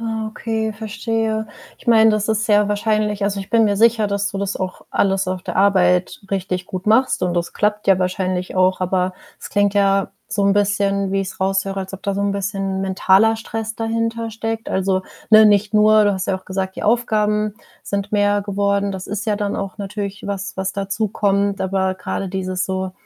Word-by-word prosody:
Ah, 225 -1 -3
okay, 220 0 -3
verstehe. 220 0 -2 0.3
Ich - - -10
meine, 225 -1 +6
das 215 0 0
ist 220 0 +1
sehr 210 -1 +3
wahrscheinlich 210 -1 0
also, 200 0 -1
ich 195 - -9
bin 230 -1 +4
mir 205 -1 +1
sicher, 225 -1 +4
dass 200 0 -1
du 200 - -5
das 200 0 -2
auch 185 -1 -5
alles 195 -1 +1
auf 185 0 -3
der - - -5
Arbeit 185 -2 +3
richtig 185 -2 -2
gut 185 +1 -6
machst 225 +2 +3
und 180 -1 -1
das 170 -1 -2
klappt 210 0 -1
ja 190 -1 +5
wahrscheinlich 185 0 -2
auch, 185 0 +2
aber 185 0 0 0.3
es - - -8
klingt 205 0 +2
ja 195 -1 +2 0.2
so 205 -1 0
'n 200 - +4
bisschen, 200 -1 +1
wie 195 0 +1
ich's 190 0 -6
raus 195 0 +1
höre, 195 0 -4
als 190 0 -5
ob 195 - -11
da 200 - 0
so 200 - -2
'n 200 - +1
bisschen 195 -1 -2
mentaler 195 +3 +3
Stress 225 0 -5
dahintersteckt. 225 0 -3
Also, 190 0 0 0.3
ne, 220 0 +8
nicht 205 +1 +2
nur 215 0 +6
du 205 - +3
hast 190 -1 -3
ja 190 - +1
auch 185 - -24
gesagt, 190 0 -4
die - - -5
Aufgaben 215 -2 +1 0.3
sind 200 +1 -3
mehr 205 0 +2
geworden. 200 0 0
Das 190 -1 -7
ist 210 +1 -3
ja 210 - +2
dann 205 -1 -2
auch 195 +1 -5
natürlich 200 0 -5
was, 195 -1 -4
was 190 0 -2
dazukommt, 200 0 0
aber 190 0 0
grade 195 - -4
dieses 185 -1 -2
so, 190 0 -3
200 Hz, 205 wpm, -20 LUFS, 190-215 Hz, 0.3 s, ne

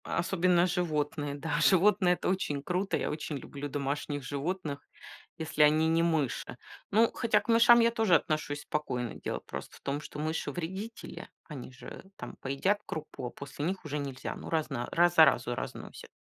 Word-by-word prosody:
Особенно 180 -1 +2
животные. 150 -4 -1
Да, 150 +1 -2
животные 190 -1 +5
это - - -4
очень 150 -7 -1
круто, 185 +4 0
я - - -2
очень 150 -1 -4
люблю 140 +2 -7
домашних 145 0 -3
животных, 145 +2 -3 0.6
если 160 -2 -2
они 155 +2 +5
не 165 +1 +3
мыши. 160 -6 0 0.3
Ну, 225 +3 +4
хотя 230 -2 +2
к - - -13
мышам 235 +1 +7
я 230 0 +4
тоже 220 -6 +3
отношусь 150 -2 0
спокойно. 125 -6 -3
Дело - - -4
просто - - -7
в - - -22
том, 140 +1 -2
что 150 - -9
мыши 155 +2 -2
вредители, 190 +6 -6 0.2
они 140 -5 -8
же 130 - -10
там - - -8
поедят 140 +10 +1
крупу, 150 -5 -6
а - - -4
после 140 +3 -6
них 185 0 -3
уже 150 0 -3
нельзя, 135 -2 -5
ну - - -8
раз 160 -2 0
на 120 0 -2
раз 175 +1 +4
заразу 140 -7 +5
разносят. - - -7
155 Hz, 175 wpm, -30 LUFS, 145-180 Hz, 0.6 s, мышам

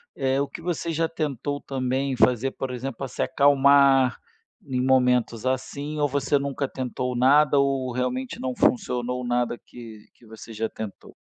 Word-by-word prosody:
eh, 135 0 0
o 140 - 0
que - - -10
você 170 -1 -3
já 165 +1 0
tentou 145 -3 -3
também 130 0 -2
fazer, 125 +2 +2
por 130 -1 -5
exemplo, 125 0 -5
pra 135 - -4
se 125 - -6
acalmar 140 -2 +4 0.5
em 130 -2 -2
momentos 125 -3 +2
assim, 140 +3 -3
ou 145 - +2
você 140 0 +1
nunca 140 0 -2
tentou 125 -1 -4
nada 140 +3 +4
ou 135 -2 0
realmente 125 +1 -3
não 130 -1 -3
funcionou 125 0 0
nada 120 0 0
que 115 -4 -13
que 120 - -22
você 110 +1 -11
já 110 +1 -2
tentou? 110 -2 -9
130 Hz, 165 wpm, -24 LUFS, 125-140 Hz, 0.5 s, acalmar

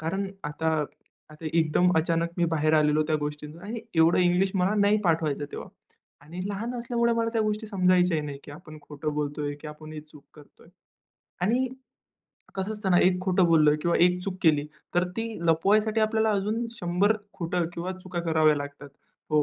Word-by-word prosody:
कारण 190 +5 -2 0.2
आता 160 +2 -2 0.6
आता 155 +1 -9
एकदम 165 +2 +3
अचानक 165 +1 +1
मी 175 - +3
बाहेर 155 0 +2
आलेलो 150 0 +3
त्या 155 - +2
गोष्टींच 150 +1 -6
आणि 210 +7 -6
एवढं 165 +1 +4
इंग्लिश 180 +2 +3
मला 190 +2 +2
नाही 205 +1 +4
पाठ 165 -2 +2
व्हायचं 145 -2 -1
तेव्हा - - -7 0.5
आणि 165 +5 -9
लहान 215 +5 -4
असल्यामुळे 235 0 0
मला 230 0 0
त्या 225 - +1
गोष्टी 215 +1 -2
समजायच्या 180 -5 +2
नाही, 145 -1 -6
की - - -11
आपण 155 +1 -12
खोटं 150 +1 -5
बोलतोय 145 0 -2
की - - -9
आपण 155 +1 -10
ही 155 - -6
चूक 150 -1 -17
करतोय. 150 +2 -18 0.7
आणि 240 +7 +2 0.9
कसं 190 +3 -2
असतं 210 -3 -3
ना, 175 - +5
एक 180 0 +3
खोटं 185 -1 +2
बोललं 155 -3 +5
किंवा 170 - +2
एक 180 0 +2
चूक 195 -2 -3
केली, 150 -3 +4 0.3
तर 175 +1 +3
ती 225 0 -1 0.2
लपवायसाठी 210 +7 +3
आपल्याला 220 0 +2
अजून 210 +4 -1
100 200 0 +1 0.2
खोटं 175 -1 -1
किंवा 175 +2 -4
चुका 180 -1 -4
कराव्या 155 -1 +4
लागतात. 145 0 -7 0.4
हो 150 -1 +4
175 Hz, 180 wpm, -26 LUFS, 155-200 Hz, 0.9 s, ना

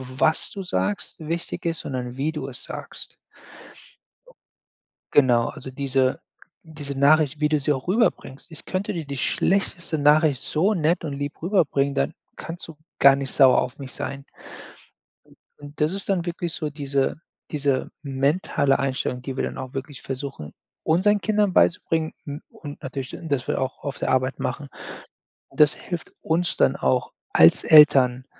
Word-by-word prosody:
w 130 - -11
was 160 - +2
du 195 - -6
sagst, 195 +1 -2
wichtig 165 +3 -4
ist, 165 -1 0
sondern 125 -1 -5
wie 150 +4 0
du 150 -4 -5
es 130 - -5
sagst. - - -7 2.0
Genau, 120 -4 +4
also 130 0 -7
diese 130 -1 0 0.4
diese 150 -3 -7
Nachricht, 145 +1 +3
wie 150 - +3
du 150 -1 +1
sie 150 - +1
auch 135 +3 -2
rüberbringst, 185 - 0
ich 160 - -11
könnte 185 +2 -2
dir 165 -6 -4
die 140 - -5
schlechteste 170 +2 0
Nachricht 150 -1 +4
so 180 +9 +1
nett 170 0 +1
und 145 - -4
lieb 145 +1 -5
rüberbringen, 145 -6 +1
dann 70 - 0 0.2
kannst 165 +1 -7
du 165 - -11 0.2
gar 140 0 +8
nicht 135 -1 -4
sauer 130 -3 +6
auf 125 - -5
mich 135 -2 -7
sein. 140 0 -5 1.4
Und 145 +1 -10
das 150 - +3
ist 195 +1 -4
dann 180 -3 +1
wirklich 170 -1 -2
so 155 -3 -3
diese 140 0 -1 0.3
diese 140 -3 0
mentale 140 0 +1
Einstellung, 130 -2 -2
die 135 0 -6
wir - - 0
dann - - -4
auch 130 +1 -7
wirklich 135 0 -6
versuchen, 135 - -6 0.3
unseren 200 +6 +3
Kindern 210 -3 +1
beizubringen, 165 -3 +2
m 145 0 -6
und 145 -2 -10
natürlich, 135 -1 -5
d 165 - -8
dass 140 -5 -1
wir - - 0
auch 130 +1 -4
auf 140 -1 -4
der - - -2
Arbeit 130 +1 +1
machen. 135 +2 -3 0.8
Das 150 -1 +4
hilft 175 -3 -7
uns 170 +2 0
dann - - +3
auch 65 0 0 0.2
als 80 +1 +6
Eltern, 130 -5 +6
145 Hz, 165 wpm, -24 LUFS, 135-165 Hz, 2.0 s, gar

